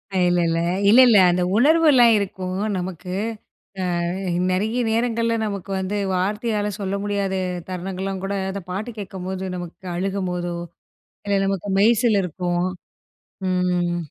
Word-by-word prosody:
அ - - +2
இல்லல்ல. 170 -2 +1 0.3
இல்லல்ல 240 0 +7
அந்த 175 +1 +1
உணர்வெல்லாம் 280 -2 +5
இருக்கும் 185 -2 -3 0.2
நமக்கு. 180 0 -5 0.9
அ - - -1 0.5
நிறைய 215 +6 0
நேரங்கள்ல 230 0 +1
நமக்கு 200 -2 -5
வந்து 190 +2 -2 0.2
வார்த்தையால 210 +2 -1
சொல்ல 195 -1 -2
முடியாத 200 -2 -1 0.3
தருணங்கள்லாம் 190 +1 -4
கூட, 195 +1 -2 0.2
அந்த 200 +1 -5
பாட்டு 210 +6 -4
கேட்கும்போது 190 -1 -5
நமக்கு 175 +1 -8
அழுகும்போதோ! 180 -2 -2 0.7
இல்ல 200 -1 +2
நமக்கு 195 0 -2
மெய்சிலிர்க்கும். 195 -6 +2 0.8
ம். 180 -1 +1
195 Hz, 110 wpm, -22 LUFS, 180-210 Hz, 0.9 s, இல்லல்ல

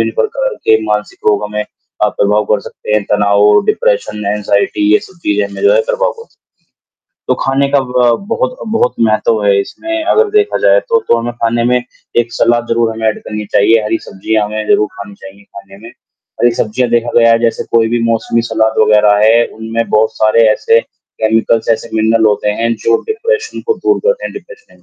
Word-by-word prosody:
प्रकार - - -1
के 110 - +5
मानसिक 105 0 -3
रोग 105 0 0
हमें 105 0 -4
अ, - - -5
प्रभाव 105 +1 +1
कर 105 - +1
सकते - - -8
हैं। 105 -1 +1
तनाव, 105 0 +3
डिप्रेशन, 470 - -1
एंग्जायटी 105 0 0
ये - - +4
सब 190 - -20
चीज़ें 105 0 0
हमें - - -9
जो 430 +4 +5
है - - +3
प्रभाव - - 0
कर 460 -1 -12
सकती - - -34
हैं। - - -71 0.9
तो - - +3
खाने 135 +1 0
का 140 - +3
ब 125 -2 +1
बहुत, 255 +2 -2
बहुत 220 - 0
महत्व 110 0 +1
है 100 -1 +3
इसमें 330 - -5
अगर 435 +5 +2
देखा 425 0 +1
जाए - - +4
तो। 470 -1 +2
तो - - +4
हमें 120 +1 -4
खाने 115 0 -1
में 125 +1 +2 0.4
एक 120 0 -5
सलाद 120 0 +1
ज़रूर 115 -1 +1
हमें 110 0 -3
ऐड 110 - -2
करनी 105 0 -5
चाहिए, 110 +2 +4
हरी 110 +1 -1
सब्ज़ियाँ 105 +2 -2
हमें 110 +1 -5
ज़रूर 105 - +3
खानी 100 0 -10
चाहिए 100 +1 -14
खाने 100 0 -14
में। 115 - -10
हरी 120 - -4
सब्ज़ियाँ 120 +3 -1
देखा 120 0 0
गया 115 0 +5
है 115 - +3
जैसे 115 -1 0
कोई 115 -1 +3
भी 120 0 -1
मौसमी 115 0 0
सलाद 110 0 +1
वग़ैरह 105 -1 +4
है 115 +1 +4
उनमें 115 +1 -3
बहुत 110 +1 +1
सारे 110 +1 +3
ऐसे 115 +2 +2
केमिकल्स 110 +1 -2
ऐसे 115 +1 -5
मिनरल 110 0 +2
होते 105 0 +1
हैं 115 0 +1
जो 115 0 +3
डिप्रेशन 450 0 -2
को 450 - +1
दूर 410 0 0
करते - - 0
हैं - - -5
डिप्रेशन 440 +2 -14
115 Hz, 200 wpm, -13 LUFS, 105-140 Hz, 0.9 s, के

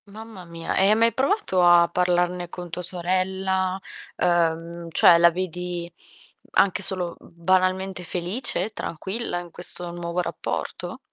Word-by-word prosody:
Mamma 210 -2 -11
mia. 165 -1 -5
E 190 - +4
hai 215 - +5
mai 230 0 +3
provato 265 - +1
a 175 -1 +7
parlarne 180 0 0
con 175 -1 -8
tua 180 - -4
sorella? 185 +1 0 0.4
Ehm, 170 -1 0
cioè 170 +1 +6
la 170 0 +7
vedi 175 0 -4 0.6
anche 195 - +3
solo 180 -3 -1
banalmente 185 +2 0
felice, 185 +6 -3
tranquilla 190 +4 -4
in 175 -1 -10
questo 175 0 -1
nuovo 170 0 -4
rapporto? - - -5
180 Hz, 130 wpm, -24 LUFS, 170-190 Hz, 0.6 s, a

